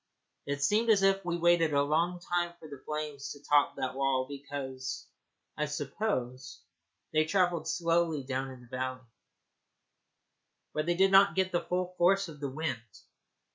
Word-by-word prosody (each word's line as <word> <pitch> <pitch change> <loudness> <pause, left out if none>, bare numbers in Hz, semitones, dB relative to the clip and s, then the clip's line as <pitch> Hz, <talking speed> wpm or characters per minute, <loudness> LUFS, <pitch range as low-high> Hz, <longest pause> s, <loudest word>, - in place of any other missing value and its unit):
It 140 0 -2
seemed 215 +9 +2
as 205 -3 +5
if 195 0 +3
we 175 -1 -1
waited 170 -3 +3
a 140 - +4
long 165 +5 +1
time 175 -1 -1
for 160 - -12
the 140 -3 -10
flames 150 -2 -4
to 145 0 -15
top 145 -1 +3
that 130 - -3
wall, 135 -1 +1
because, 135 -2 -6 0.5
I 150 - -1
suppose, 135 - -3 0.5
they 155 0 +4
travelled 175 -2 +1
slowly 165 -2 +1
down 135 0 -3
in 130 -1 -11
the 125 - -16
valley 130 +1 -3
beyond, 130 - -19 1.7
where 155 - -1
they 175 0 +1
did 190 +2 +4
not 195 +1 +6
get 190 -1 +1
the 175 - +1
full 180 0 -2
force 195 +3 +4
of 150 -2 -11
the 140 -1 -3
wind. 130 -7 -5
155 Hz, 170 wpm, -30 LUFS, 135-175 Hz, 1.7 s, not